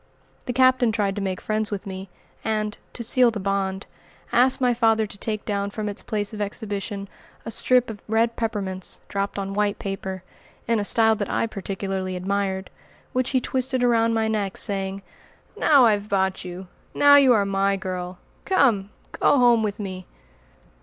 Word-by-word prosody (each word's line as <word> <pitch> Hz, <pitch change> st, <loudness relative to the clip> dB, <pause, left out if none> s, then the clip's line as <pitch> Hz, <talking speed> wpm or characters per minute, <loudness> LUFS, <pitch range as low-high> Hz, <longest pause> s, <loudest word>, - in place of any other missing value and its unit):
The -, -, 0 dB
Captain 255 Hz, -2 st, +4 dB
tried 205 Hz, -3 st, 0 dB
to 205 Hz, -, -3 dB
make 190 Hz, -2 st, -2 dB
friends 215 Hz, 0 st, -1 dB
with 205 Hz, -2 st, -5 dB
me, 190 Hz, -1 st, -7 dB, 0.3 s
and, 215 Hz, -1 st, -1 dB, 0.2 s
to 235 Hz, -, -4 dB
seal 250 Hz, +1 st, +4 dB
the 220 Hz, -2 st, -4 dB
bond, 195 Hz, 0 st, -2 dB, 0.5 s
asked 255 Hz, +2 st, +4 dB
my 250 Hz, -2 st, +3 dB
father 225 Hz, -2 st, +3 dB
to 205 Hz, -, -9 dB
take 215 Hz, -2 st, -3 dB
down 200 Hz, -1 st, -1 dB
from 215 Hz, +1 st, -4 dB
its 205 Hz, -, -4 dB
place 210 Hz, -1 st, -3 dB
of 210 Hz, -, -5 dB
exhibition 205 Hz, -1 st, -4 dB, 0.4 s
a 225 Hz, -, -4 dB
strip 250 Hz, +2 st, +2 dB
of 215 Hz, -3 st, -8 dB
red 225 Hz, +2 st, +1 dB
peppermints 200 Hz, -5 st, -2 dB
dropped 200 Hz, 0 st, -3 dB
on 195 Hz, 0 st, -3 dB
white 205 Hz, 0 st, 0 dB
paper, 190 Hz, -1 st, -5 dB, 0.4 s
in 230 Hz, -1 st, +2 dB
a -, -, 0 dB
style 220 Hz, +1 st, +4 dB
I -, -, +1 dB
particularly 195 Hz, -2 st, -4 dB
admired, 190 Hz, +1 st, -2 dB, 0.4 s
which 255 Hz, 0 st, +1 dB
he 260 Hz, -, +2 dB
twisted 255 Hz, 0 st, -1 dB
around 230 Hz, -1 st, +3 dB
my 220 Hz, 0 st, +1 dB
neck, 205 Hz, -3 st, -2 dB
saying, 195 Hz, -1 st, -2 dB, 0.5 s
"Now 280 Hz, -5 st, +5 dB
I've 210 Hz, -2 st, +1 dB
bought 190 Hz, -1 st, 0 dB
you! 180 Hz, +1 st, -7 dB, 0.3 s
Now 285 Hz, 0 st, +7 dB
you 270 Hz, -3 st, +6 dB
are 205 Hz, -3 st, +3 dB
my 195 Hz, 0 st, +1 dB
girl. 180 Hz, -1 st, -5 dB, 0.3 s
Come, 235 Hz, -, +2 dB, 0.2 s
go -, -, +3 dB
home 240 Hz, -3 st, +5 dB
with 210 Hz, -1 st, -2 dB
me!" 185 Hz, -3 st, -6 dB
205 Hz, 175 wpm, -24 LUFS, 195-230 Hz, 0.5 s, Now